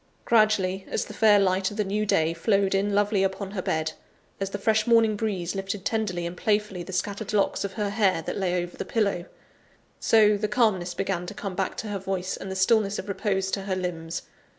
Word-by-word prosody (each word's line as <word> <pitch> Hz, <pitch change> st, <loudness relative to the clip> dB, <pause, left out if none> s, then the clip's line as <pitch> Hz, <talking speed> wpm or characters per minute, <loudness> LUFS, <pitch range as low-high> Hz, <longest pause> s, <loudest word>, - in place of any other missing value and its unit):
Gradually, 210 Hz, -4 st, +3 dB
as -, -, -1 dB
the -, -, -9 dB
fair 215 Hz, -2 st, +5 dB
light 190 Hz, -1 st, +2 dB
of 205 Hz, -, -9 dB
the 210 Hz, -, +2 dB
new 210 Hz, +2 st, -1 dB
day 160 Hz, -3 st, +2 dB
flowed 195 Hz, +3 st, +1 dB
in 200 Hz, +1 st, +1 dB
lovely 205 Hz, -1 st, +2 dB
upon 195 Hz, 0 st, -1 dB
her 195 Hz, -2 st, -3 dB
bed; 160 Hz, -2 st, -1 dB, 0.5 s
as 195 Hz, -1 st, -2 dB
the 205 Hz, -, -4 dB
fresh 215 Hz, +2 st, +1 dB
morning 230 Hz, -2 st, +4 dB
breeze 200 Hz, -5 st, -2 dB
lifted 195 Hz, 0 st, -4 dB
tenderly 200 Hz, -6 st, -1 dB
and 170 Hz, +1 st, -4 dB
playfully 210 Hz, -2 st, 0 dB
the 180 Hz, -, -8 dB
scattered 200 Hz, +3 st, -3 dB
locks 205 Hz, -2 st, +1 dB
of 200 Hz, -1 st, -4 dB
her 205 Hz, +1 st, -2 dB
hair 195 Hz, -6 st, +2 dB
that -, -, -4 dB
lay 180 Hz, -2 st, 0 dB
over 175 Hz, -, -9 dB
the -, -, -4 dB
pillow 200 Hz, -6 st, 0 dB, 0.7 s
so, 210 Hz, -2 st, +5 dB
the 210 Hz, +1 st, -1 dB
calmness 210 Hz, -6 st, +1 dB
began 180 Hz, -2 st, -2 dB
to 205 Hz, -, -7 dB
come 195 Hz, -1 st, -5 dB
back 185 Hz, 0 st, -2 dB
to 220 Hz, -, -4 dB
her 200 Hz, -1 st, -3 dB
voice 190 Hz, -1 st, -3 dB
and 195 Hz, -, -7 dB
the 190 Hz, -, -4 dB
stillness 200 Hz, +1 st, +2 dB
of 190 Hz, -, -6 dB
repose 195 Hz, -1 st, -1 dB
to 200 Hz, -, -1 dB
her 190 Hz, -1 st, -1 dB
limbs. 170 Hz, -2 st, -4 dB
195 Hz, 220 wpm, -26 LUFS, 185-210 Hz, 0.7 s, fair